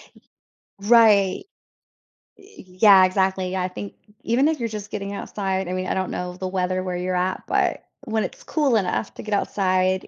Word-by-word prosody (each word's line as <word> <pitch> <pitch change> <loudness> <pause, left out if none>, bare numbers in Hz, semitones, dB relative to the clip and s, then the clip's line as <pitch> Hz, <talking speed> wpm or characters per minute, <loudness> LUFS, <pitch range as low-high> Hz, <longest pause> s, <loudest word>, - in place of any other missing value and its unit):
Y - - -20 0.7
right. 210 -5 +5 0.9
Y - - -18 0.4
yeah, 195 -3 +8
exactly. 190 0 0
I 180 0 -1
think 190 +2 -8 0.3
even 250 +5 +2
if 315 -1 -1
you're 230 -1 -2
just 210 -1 -7
getting 200 -1 -5
outside, 190 -2 -3
I 180 - -3
mean, 185 0 -3
I - - 0
don't 190 -1 -2
know 180 0 -5
the 185 - -4
weather 185 0 -1
where 180 -1 -3
you're 180 +1 -2
at, 180 +1 -1
but - - 0 0.2
when 220 -1 -1
it's - - -7
cool 290 -6 +1
enough 110 - -2
to - - -9
get 215 - -4
outside 185 -2 0
190 Hz, 185 wpm, -23 LUFS, 185-210 Hz, 0.9 s, yeah